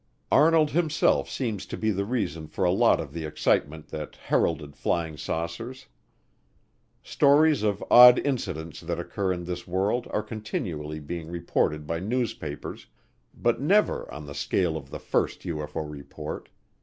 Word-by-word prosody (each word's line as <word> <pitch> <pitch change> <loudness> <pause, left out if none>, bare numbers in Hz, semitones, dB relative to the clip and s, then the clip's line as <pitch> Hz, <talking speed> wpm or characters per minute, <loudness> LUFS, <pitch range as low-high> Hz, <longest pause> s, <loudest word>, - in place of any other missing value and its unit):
Arnold 155 0 +5
himself 160 -1 +2
seems 110 -6 -3
to - - -5
be 110 0 +1
the 100 0 -1
reason 95 -9 -2
for 95 - -3
a 90 - +4
lot 95 - +4
of 70 - -6
the 85 -1 -4
excitement 75 0 0
that 75 -1 -6
heralded 75 -3 -1
flying 80 +1 -1
saucers. 85 - -4 1.2
Stories 150 -1 +4
of 105 -2 0
odd 125 0 +10
incidents 90 - -3
that - - -3
occur 95 -2 -2
in 90 -1 -3
this 90 0 -5
world 100 +7 0
are 105 - -1
continually 90 -8 -4
being 80 +2 -6
reported 75 -3 -1
by 80 +2 -2
newspapers, 110 - -4 0.5
but - - 0
never - - +2
on 75 +2 -8
the 70 - -8
scale 80 +4 0
of 70 -4 -7
the - - -6
first - - -1
UFO 75 -2 -4
report. 75 -2 -7
90 Hz, 150 wpm, -26 LUFS, 75-115 Hz, 1.2 s, odd